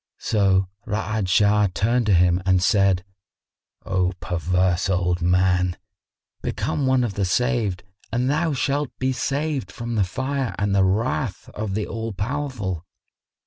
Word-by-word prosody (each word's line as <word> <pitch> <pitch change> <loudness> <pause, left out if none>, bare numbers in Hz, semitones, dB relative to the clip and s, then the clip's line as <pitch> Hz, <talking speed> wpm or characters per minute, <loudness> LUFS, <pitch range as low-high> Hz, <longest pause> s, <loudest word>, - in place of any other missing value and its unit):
So 95 -3 +2 0.2
Ra'ad 110 -1 -1
Shah 105 +1 +4
turned 115 +2 +1
to 100 - +5
him 90 +1 +3
and 95 -1 +3
said, 95 -2 +3 0.8
"O 95 -1 0
perverse 90 +1 0
old 90 -1 +1
man, 90 0 +2 0.6
become 140 - -1
one 130 -1 +3
of 115 -4 -2
the 100 - -1
saved 110 -2 0 0.3
and 120 +2 0
thou 155 +4 +1
shalt 140 +1 0
be 130 0 0
saved 140 -4 -2
from 120 +3 -5
the 105 -3 +2
fire 130 +6 -2
and 100 -1 0
the 100 -1 +4
wrath 105 +2 -1
of 105 -2 -4
the 105 -1 -1
All 115 -1 -4
powerful." 105 - -3
105 Hz, 145 wpm, -23 LUFS, 95-125 Hz, 0.8 s, to